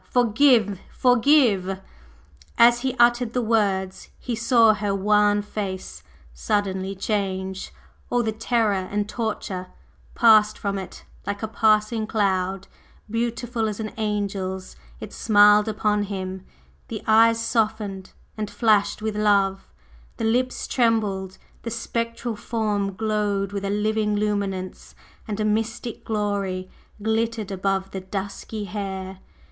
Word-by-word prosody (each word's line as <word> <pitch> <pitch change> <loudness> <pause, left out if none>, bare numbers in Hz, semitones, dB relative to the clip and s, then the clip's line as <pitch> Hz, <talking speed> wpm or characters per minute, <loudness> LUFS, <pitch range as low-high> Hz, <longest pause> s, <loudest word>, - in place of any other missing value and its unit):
Forgive 230 -4 +3
forgive!" 235 -7 +3 0.8
As 240 +1 +6
he 260 0 -2
uttered 240 -1 +3
the 250 - +1
words, 195 -4 0
he 245 - -5
saw 230 -1 +4
her 205 -1 -1
wan 205 +1 +3
face 190 - -5 0.3
suddenly 190 - -1
change, 190 -2 -3 0.4
all 245 0 +1
the 220 - 0
terror 225 -1 +1
and 200 +2 -2
torture 210 -5 -4 0.5
passed 215 -2 +5
from 200 -1 -2
it 190 - -9 0.2
like 200 +1 -3
a - - 0
passing 215 0 +2
cloud, 195 -3 0 0.4
beautiful 235 0 -1
as 210 0 -4
an 215 -1 -3
angel's, 200 -3 -3 0.2
it - - -8
smiled 210 0 +5
upon 210 -1 0
him, 190 -1 -5 0.4
the 220 - -6
eyes 225 +1 +5
softened 215 -4 -1 0.2
and 215 -2 -4
flashed 215 -2 +2
with 220 -1 -2
love, 200 -2 +2 0.5
the 225 - -2
lips 250 +3 0
trembled, 210 -6 0 0.2
the 230 - -5
spectral 230 0 -3
form 205 -3 -2
glowed 205 -2 -1
with 200 -1 -4
a 200 - -2
living 210 +1 0
luminance, 200 -3 -3 0.3
and 210 -1 -4
a 215 - +1
mystic 225 +2 -2
Glory 200 -4 -2 0.3
glittered 220 -1 -1
above 195 0 -1
the 190 - -5
dusky 200 +2 -5
hair! 190 -2 -5
210 Hz, 125 wpm, -24 LUFS, 195-225 Hz, 0.8 s, As